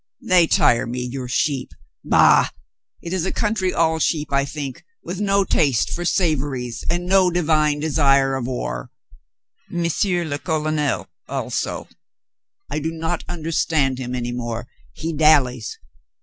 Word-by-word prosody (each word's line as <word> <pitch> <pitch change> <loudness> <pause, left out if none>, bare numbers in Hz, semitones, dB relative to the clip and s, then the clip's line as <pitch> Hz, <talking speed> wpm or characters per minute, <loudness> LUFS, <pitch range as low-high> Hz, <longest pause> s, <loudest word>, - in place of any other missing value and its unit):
"They 180 -3 +4
tire 115 -6 +3
me, 125 +1 -3
your 125 +1 -5
sheep. 135 +1 0 0.3
Bah, - - +5 0.5
it 170 - -4
is 185 -3 0
a 190 - -1
coun 210 -1 0
try 190 -4 0
all 160 -2 +1
sheep, 150 -2 0
I 140 0 +3
think, 140 -2 -6 0.2
with 185 +3 -5
no 200 -1 +3
taste 140 - +1
for 175 - -3
savories 140 - -1
and 175 +1 -1
no 185 0 +4
divine 155 -4 +2
desire 140 -3 +3
of 130 -2 -3
war. - - -4 0.8
M. 175 0 -1 0.2
le 170 -6 -1
Colonel 155 -2 -1 0.2
also, - - -3 0.8
I - - -3
do 155 +2 -2
not 165 +1 -3
understand 155 -5 0
him 125 -1 -4
any 120 -1 -3
more. 120 -1 -4 0.2
He 165 +1 -4
dallies. 140 -6 +3
155 Hz, 145 wpm, -21 LUFS, 130-170 Hz, 0.8 s, Bah